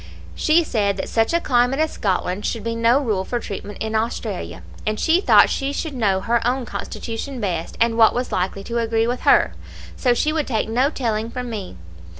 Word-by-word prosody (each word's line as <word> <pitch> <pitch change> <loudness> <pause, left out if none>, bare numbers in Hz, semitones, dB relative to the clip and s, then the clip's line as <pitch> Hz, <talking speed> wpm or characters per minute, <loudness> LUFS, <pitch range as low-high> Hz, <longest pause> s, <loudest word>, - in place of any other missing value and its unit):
She 325 +2 +3
said 205 -8 0
that 190 - -4
such 225 -1 +1
a 340 - +2
climate 250 -2 +2
as 315 0 +1
Scotland 190 0 -1
should 225 -1 -2
be 230 0 -2
no 230 +3 +3
rule 215 -9 -1
for 240 +5 -2
treatment 205 -1 -7
in 220 0 -3
Australia, 210 - -3 0.2
and 215 0 -2
she 335 +3 +3
thought - - +6
she 275 0 -2
should 305 +1 -4
know 200 -7 +1
her 235 +2 +1
own 250 +1 0
constitution 240 +4 -5
best, 175 -6 -3
and 230 0 +2
what 220 - +6
was 245 +1 -2
likely 190 +2 -2
to 235 +3 -2
agree 225 -1 +1
with 245 +2 -2
her; - - +4 0.4
so 245 -2 +2
she 305 +5 +1
would 310 -2 -1
take 220 -4 -1
no 250 +5 +2
telling 225 -6 -2
from 250 0 -5
me. 200 - -6
230 Hz, 205 wpm, -21 LUFS, 210-255 Hz, 0.4 s, thought